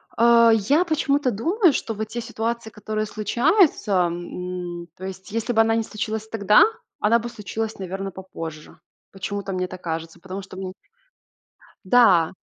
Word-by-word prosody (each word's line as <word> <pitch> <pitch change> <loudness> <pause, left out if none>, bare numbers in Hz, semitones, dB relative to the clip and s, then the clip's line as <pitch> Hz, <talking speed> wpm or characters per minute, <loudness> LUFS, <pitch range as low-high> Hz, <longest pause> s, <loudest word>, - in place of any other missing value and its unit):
Э, 235 0 +6
я 280 - +3
почему-то 285 -4 +1
думаю, 335 - +2
что 225 - -2
вот 215 0 -4
те 235 +1 -4
ситуации, 230 0 -3
которые 215 0 -3
случаются, 235 - +2 0.2
м, 175 0 -6
то 185 - -8
есть 190 +1 -8
если 230 +2 -1
бы 225 - +5
она 225 0 +3
не 225 - +1
случилась 220 0 -4
тогда, 210 -1 +5 0.4
она 225 +3 +3
бы 235 +1 -5
случилась, 220 0 -5
наверно, 195 +1 -4
попозже. 165 -4 -9 0.3
Почему-то 195 0 -4
мне 185 0 -1
так 185 0 -10
кажется. 165 0 -5
Потому 190 +2 -7
что 190 -1 -11
мне 185 -1 -5 1.1
Да. 185 -7 +5
215 Hz, 155 wpm, -23 LUFS, 185-230 Hz, 1.1 s, Э